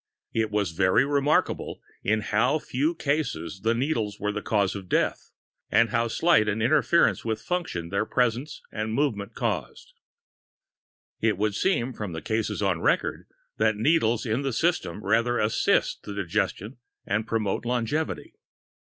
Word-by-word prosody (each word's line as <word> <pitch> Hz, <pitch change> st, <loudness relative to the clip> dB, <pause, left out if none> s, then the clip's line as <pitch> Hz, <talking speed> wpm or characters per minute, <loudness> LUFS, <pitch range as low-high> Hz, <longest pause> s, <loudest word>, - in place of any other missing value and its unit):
It 110 Hz, -1 st, +1 dB
is 105 Hz, -4 st, 0 dB
very 95 Hz, +9 st, +3 dB
remarkable 145 Hz, +1 st, +1 dB, 0.2 s
in 110 Hz, +1 st, +1 dB
how 115 Hz, +7 st, +2 dB
few 150 Hz, +3 st, -1 dB
cases 125 Hz, -, -2 dB
the 115 Hz, +3 st, +2 dB
needles 115 Hz, -6 st, -1 dB
were 105 Hz, -, -1 dB
the 105 Hz, 0 st, -4 dB
cause 100 Hz, -3 st, +1 dB
of 95 Hz, -2 st, -8 dB
death, -, -, 0 dB, 0.4 s
and 115 Hz, -1 st, +3 dB
how 115 Hz, -1 st, +1 dB
slight 115 Hz, -3 st, +3 dB
an 105 Hz, +1 st, -1 dB
interference 150 Hz, +8 st, +3 dB
with 110 Hz, -1 st, -2 dB
function 140 Hz, -, -3 dB
their 100 Hz, +3 st, -1 dB
presence 125 Hz, +4 st, -1 dB
and 110 Hz, 0 st, -3 dB
movement 115 Hz, -7 st, -1 dB
cause." -, -, -3 dB, 1.3 s
It 110 Hz, -3 st, +1 dB
would 105 Hz, +1 st, 0 dB
seem, 130 Hz, -, 0 dB
from 105 Hz, -6 st, -5 dB
the 80 Hz, -, -5 dB
cases 110 Hz, -1 st, -1 dB
on 90 Hz, -4 st, +1 dB
record, -, -, 0 dB, 0.3 s
that 110 Hz, 0 st, +2 dB
needles 120 Hz, -2 st, +2 dB
in 115 Hz, +3 st, 0 dB
the 135 Hz, -2 st, -2 dB
system 165 Hz, -6 st, 0 dB
rather 120 Hz, +1 st, +2 dB
assist 110 Hz, -1 st, +1 dB
in 100 Hz, -, -5 dB
the 100 Hz, -, -1 dB
digestion 105 Hz, +7 st, -2 dB, 0.3 s
and 110 Hz, +2 st, -1 dB
promote 110 Hz, -3 st, -1 dB
longevity. 125 Hz, +6 st, -2 dB
110 Hz, 155 wpm, -26 LUFS, 105-135 Hz, 1.3 s, very